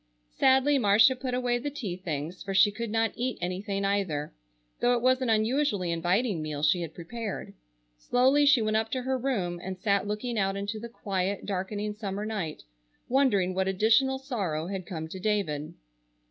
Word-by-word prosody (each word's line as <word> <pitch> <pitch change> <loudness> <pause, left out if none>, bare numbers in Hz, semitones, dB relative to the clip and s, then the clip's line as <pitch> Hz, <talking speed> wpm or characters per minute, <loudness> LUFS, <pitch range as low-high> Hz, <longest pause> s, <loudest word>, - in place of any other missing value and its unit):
Sadly 265 - +4
Marcia 220 +3 +5
put 255 -1 -3
away 245 -1 0
the 290 +4 -3
tea 225 -11 -5
things, 170 -1 -5
for 195 0 -4
she 200 +2 +6
could 230 +2 -5
not 225 +1 +1
eat 255 +1 -2
anything 195 +3 -2
either, 185 -7 -1 0.5
though 245 0 +3
it 240 - +1
was 255 +1 +3
an 255 - 0
unusually 220 -4 +1
inviting 180 +3 0
meal 150 -1 -4
she 165 +4 +3
had 160 -2 -6
prepared. 210 +5 -6 0.5
Slowly 265 - +3
she 275 -5 +5
went 215 0 +1
up 220 0 -1
to 255 -1 -1
her 265 +1 0
room 190 -10 -2
and 185 0 -5
sat 200 0 +1
looking 215 +2 -2
out 195 0 0
into 205 +2 -3
the 235 +2 -7
quiet, 195 -3 -2
darkening 205 +2 -3
summer 205 -1 -4
night, 195 -8 -4 0.5
wondering 240 -9 +3
what 190 +1 0
additional 225 +8 +3
sorrow 200 - -3
had 185 -1 -5
come 160 -5 -5
to 185 +4 -8
David. 185 -8 -1
205 Hz, 180 wpm, -28 LUFS, 185-245 Hz, 0.5 s, she